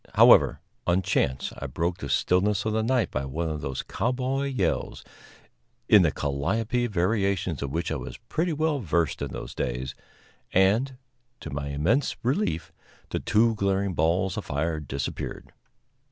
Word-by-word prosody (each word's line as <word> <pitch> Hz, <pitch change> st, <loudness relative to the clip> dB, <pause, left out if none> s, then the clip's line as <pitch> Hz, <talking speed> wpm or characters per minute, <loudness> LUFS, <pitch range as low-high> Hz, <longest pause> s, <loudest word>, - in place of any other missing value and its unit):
However, -, -, +6 dB, 0.3 s
on 90 Hz, +2 st, +3 dB
chance, 65 Hz, -6 st, 0 dB
I 70 Hz, -, -4 dB
broke 85 Hz, +6 st, -2 dB
the -, -, -5 dB
stillness 100 Hz, +3 st, +2 dB
of 110 Hz, -, 0 dB
the 110 Hz, -, +1 dB
night 115 Hz, -3 st, +1 dB
by 65 Hz, -, -2 dB
one 80 Hz, +5 st, -2 dB
of 75 Hz, -1 st, -4 dB
those 65 Hz, -2 st, -3 dB
cowboy 130 Hz, +3 st, -1 dB
yells, 100 Hz, -11 st, -1 dB, 0.8 s
in -, -, +7 dB
the -, -, +4 dB
calliope 110 Hz, -, -1 dB
variations 95 Hz, -, 0 dB
of 70 Hz, -, -2 dB
which 80 Hz, +4 st, -2 dB
I 80 Hz, -, -1 dB
was -, -, -7 dB
pretty 170 Hz, +2 st, -2 dB
well 155 Hz, -1 st, 0 dB
versed 85 Hz, -, 0 dB
in 70 Hz, -, -2 dB
those -, -, -7 dB
days, 65 Hz, +2 st, -3 dB, 0.6 s
and, 110 Hz, +8 st, +3 dB, 0.4 s
to -, -, -7 dB
my 70 Hz, 0 st, -3 dB
immense 85 Hz, -, +1 dB
relief, 105 Hz, -, -1 dB, 0.4 s
the -, -, -1 dB
two 115 Hz, +1 st, +3 dB
glaring 100 Hz, -2 st, 0 dB
balls 85 Hz, +4 st, +1 dB
of -, -, -4 dB
fire 80 Hz, +2 st, -1 dB
disappeared. 70 Hz, -1 st, -5 dB
90 Hz, 155 wpm, -26 LUFS, 75-115 Hz, 0.8 s, in